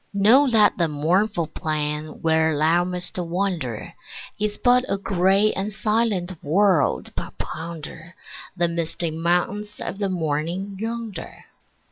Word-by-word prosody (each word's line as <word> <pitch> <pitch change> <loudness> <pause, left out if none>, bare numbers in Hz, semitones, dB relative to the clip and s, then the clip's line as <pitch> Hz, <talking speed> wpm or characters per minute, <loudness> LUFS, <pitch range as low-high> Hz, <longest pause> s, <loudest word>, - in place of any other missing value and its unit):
Know 240 +8 +5
that 215 -5 +4
the 170 - +3
mournful 170 +5 +1
plain 150 0 -3
where 160 -1 +3
thou 165 +4 +3
must 180 0 -4
wander 170 - -2 0.5
Is 210 0 -1
but 250 0 +4
a 195 - +1
gray 195 +2 +2
and 195 +2 -3
silent 210 -5 0
world, 160 - +2
but - - -6
ponder 165 +1 -7 0.4
The 175 -1 +2
misty 170 0 -2
mountains 180 +6 -1
of 195 - -5
the 200 -2 0
morning 170 +3 -2
yonder. 225 -5 -6
180 Hz, 125 wpm, -23 LUFS, 160-205 Hz, 0.5 s, Know